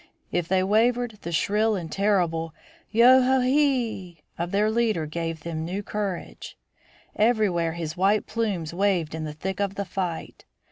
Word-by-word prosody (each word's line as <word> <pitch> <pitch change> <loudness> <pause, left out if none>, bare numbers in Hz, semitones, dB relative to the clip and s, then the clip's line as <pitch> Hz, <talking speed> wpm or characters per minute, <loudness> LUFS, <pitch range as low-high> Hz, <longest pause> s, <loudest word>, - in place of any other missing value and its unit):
If 175 -2 -1
they 185 +1 +2
wavered, 225 +2 +1
the 170 - -5
shrill 210 +6 +1
and 170 -5 -5
terrible 170 -6 0 0.3
"Yo 245 +4 +6
ho 260 +1 +3
e 255 +1 +1
hee" 235 - 0
of 170 +1 -3
their 210 +3 +1
leader 220 -8 +1
gave 165 +1 -4
them 160 -1 -4
new 185 +5 -4
courage. 200 -4 -5 0.6
Everywhere 210 -7 +2
his 165 -2 -5
white 200 +3 +2
plumes 200 -9 -2
waved 180 -4 0
in 160 -1 -4
the 150 - -5
thick 190 +5 -5
of 200 -1 -1
the 200 - -3
fight. 180 -2 -5
195 Hz, 160 wpm, -25 LUFS, 170-220 Hz, 0.6 s, Yo